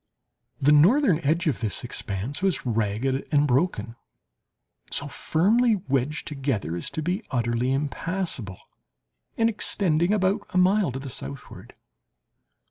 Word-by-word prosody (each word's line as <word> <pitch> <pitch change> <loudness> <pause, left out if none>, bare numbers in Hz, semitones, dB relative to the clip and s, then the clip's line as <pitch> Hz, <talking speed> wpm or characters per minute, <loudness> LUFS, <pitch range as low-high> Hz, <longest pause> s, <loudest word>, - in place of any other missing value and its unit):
The 140 +2 +4
northern 180 - +5
edge 165 +3 0
of 155 - 0
this 110 +3 -4
expanse 115 - -4
was 190 -9 0
ragged 115 +4 -1
and 145 -1 +4
broken, 125 - 0 0.9
so 145 - 0
firmly 215 - +2
wedged 150 -5 -2
together 135 - -2
as 85 - -4
to 155 - -4
be 180 +6 -1
utterly 120 0 0
impassible, 140 - -3 0.8
and 225 - +3
extending 180 -5 +2
about 200 0 +1
a 185 - -2
mile 185 -2 +3
to 130 - -5
the 135 -1 -7
southward. 70 - -9
145 Hz, 130 wpm, -25 LUFS, 125-185 Hz, 0.9 s, northern